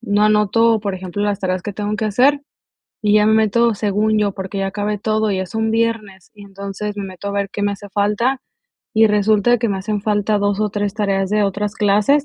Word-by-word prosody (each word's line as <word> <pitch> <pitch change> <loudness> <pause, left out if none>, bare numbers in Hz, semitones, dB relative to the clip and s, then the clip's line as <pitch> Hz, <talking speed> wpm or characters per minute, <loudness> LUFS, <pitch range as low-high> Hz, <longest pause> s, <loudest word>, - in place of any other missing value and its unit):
no 210 -3 0
anoto, 215 +1 +3
por 200 -2 -3
ejemplo, 190 +2 -5
las 205 -1 0
tareas 185 -2 -2
que 205 - -5
tengo 210 +1 -3
que 220 - -2
hacer, 265 +7 +3 0.6
y 210 -1 +2
ya 210 0 +4
me 220 - +4
meto 220 +1 +3
según 210 +1 0
yo, 205 -1 +1
porque 190 +1 -6
ya 195 - -1
acabé 205 +1 -2
todo, 215 0 0
ya 190 -1 -1
es 185 - -14
un 220 0 0
viernes, 225 -5 -2
y 205 - -13
entonces 200 +1 -6
me 200 - -4
meto 190 +1 -7
a - - -2
ver 200 -1 -1
qué 205 - -5
me 205 0 +1
hace 205 0 -9
falta, 210 +6 0 0.5
y 220 0 +5
resulta 210 +3 +3
que 230 - 0
me 195 - -2
hacen 205 +1 -3
falta 210 0 +1
2 205 0 0
o 210 - +1
3 205 -1 -2
tareas 195 -2 -1
de 210 0 +2
otras 205 +1 -2
clases, 210 +8 +2
210 Hz, 230 wpm, -19 LUFS, 200-215 Hz, 0.6 s, y